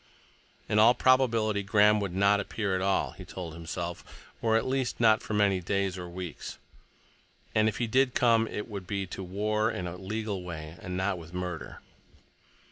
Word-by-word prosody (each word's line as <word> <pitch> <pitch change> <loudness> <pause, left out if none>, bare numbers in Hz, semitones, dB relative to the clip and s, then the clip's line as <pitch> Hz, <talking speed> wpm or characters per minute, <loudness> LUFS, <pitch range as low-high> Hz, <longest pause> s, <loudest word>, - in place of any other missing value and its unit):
In 105 - +2
all 115 +3 +7
probability 115 -5 +3
Graham 105 +1 +4
would 95 -3 -3
not 100 +1 +4
appear 100 0 -2
at 95 - -1
all, 95 0 +1
he - - -11
told 85 -4 -7
himself, 85 +1 -5 0.4
or 110 -1 +3
at 115 - -1
least 130 -1 -1
not 110 -2 +5
for 110 - -4
many 100 -2 +3
days—or 95 -1 -2
weeks; 90 -2 -7 1.0
and 110 0 +4
if 105 - -5
he 120 - 0
did 130 +3 +2
come, 115 -2 +4
it 105 - -5
would 100 -4 -7
be 100 0 -2
to 95 +1 -7
war 105 +4 0
in 90 -6 -4
a 90 0 -5
legal 105 0 -3
way, 80 -3 -7
and 90 -3 -4
not 95 -1 0
with 85 +1 -11
murder. 90 -2 -5
100 Hz, 180 wpm, -29 LUFS, 90-110 Hz, 1.0 s, all